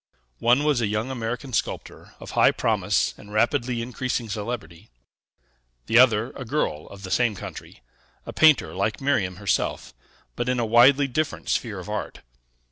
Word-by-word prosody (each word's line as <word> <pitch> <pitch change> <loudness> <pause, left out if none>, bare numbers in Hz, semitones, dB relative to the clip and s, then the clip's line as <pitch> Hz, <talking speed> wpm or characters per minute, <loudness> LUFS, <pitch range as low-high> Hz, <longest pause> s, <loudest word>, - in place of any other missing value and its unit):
One 125 +5 +3
was 150 -5 +2
a 110 - +1
young 110 +5 -2
American 125 +1 -4
sculptor, - - -4
of - - -9
high - - +5
promise - - 0
and 105 - -13
rapidly 120 +2 0
increasing 125 -1 -3
celebrity; 100 -5 -6 1.0
the 115 - +4
other, 115 -2 +4
a 135 - -8
girl 115 - -2
of 100 0 -12
the 95 - -7
same 120 -2 +2
country, 60 - -10 0.4
a - - -7
painter 155 -3 +4
like 100 +3 -1
Miriam 110 -10 0
herself, 100 +2 -2 0.4
but 120 +1 -2
in 125 -1 0
a 120 - +1
widely 130 +5 +5
different 155 +4 -3
sphere - - -1
of - - -8
art. - - -5
120 Hz, 160 wpm, -24 LUFS, 105-130 Hz, 1.0 s, high